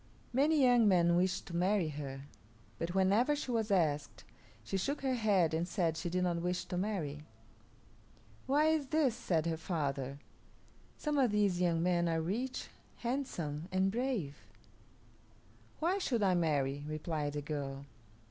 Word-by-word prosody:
Many 290 +3 +3
young 245 -3 +5
men 170 -3 +4
wished 185 +2 +1
to 170 - -7
marry 180 -1 +2
her, 140 -2 -6 0.6
but 170 +2 -3
whenever 205 +9 +3
she 285 -3 -4
was 225 -2 0
asked 155 -7 0 0.4
she - - -4
shook 275 +10 -1
her 265 -1 0
head 200 -9 +2
and 165 +2 0
said 170 -4 0
she 175 - -3
did 180 +1 0
not 175 -2 +1
wish 180 +1 -1
to - - -5
marry. 175 -7 -2 1.3
"Why 290 +3 +3
is 310 -3 +1
this?" 300 -4 +2
said 165 -7 -1
her 165 -1 -1
father. 140 -5 -2 0.8
"Some 300 -2 -1
of 255 -3 +4
these 205 -4 +1
young 170 -2 +2
men 175 -1 +2
are 165 0 +1
rich, 225 +11 -3 0.3
handsome, 180 - -3
and 190 +1 +2
brave." 230 - -2 1.4
"Why 355 +5 +1
should 240 - 0
I 190 -2 +4
marry?" 145 -5 0
replied 155 -1 -3
the 145 -1 -3
girl. 140 -2 -4
180 Hz, 155 wpm, -33 LUFS, 160-235 Hz, 1.4 s, young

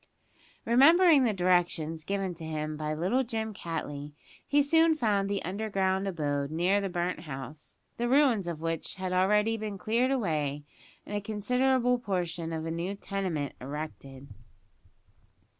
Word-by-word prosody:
Remembering 290 +4 +6
the 230 - +2
directions 175 -4 +1
given 195 +1 -2
to 165 -1 -10
him 155 -1 -3
by 155 0 -3
little 190 +12 +1
Jim 220 -2 -3
Cattley, 150 -5 -5 0.3
he 290 0 +4
soon 325 +2 +4
found 205 -8 +1
the 200 -1 -1
underground 195 0 -1
abode 145 -6 -1
near 180 +6 +2
the 195 - -2
burnt 175 0 -2
house, 145 0 -9 0.2
the 240 0 -1
ruins 255 -8 +3
of 165 -2 -4
which 165 -1 -3
had 185 -1 -3
already 210 +4 +3
been 210 -2 -5
cleared 230 +6 +1
away 155 - -1 0.4
and 205 - -5
a 205 - -1
considerable 250 +4 +1
portion 175 -6 -3
of 160 -1 -3
a 165 - -3
new 170 +4 -3
tenement 185 -9 -3
erected. 140 -1 -7
190 Hz, 145 wpm, -29 LUFS, 160-220 Hz, 0.4 s, Remembering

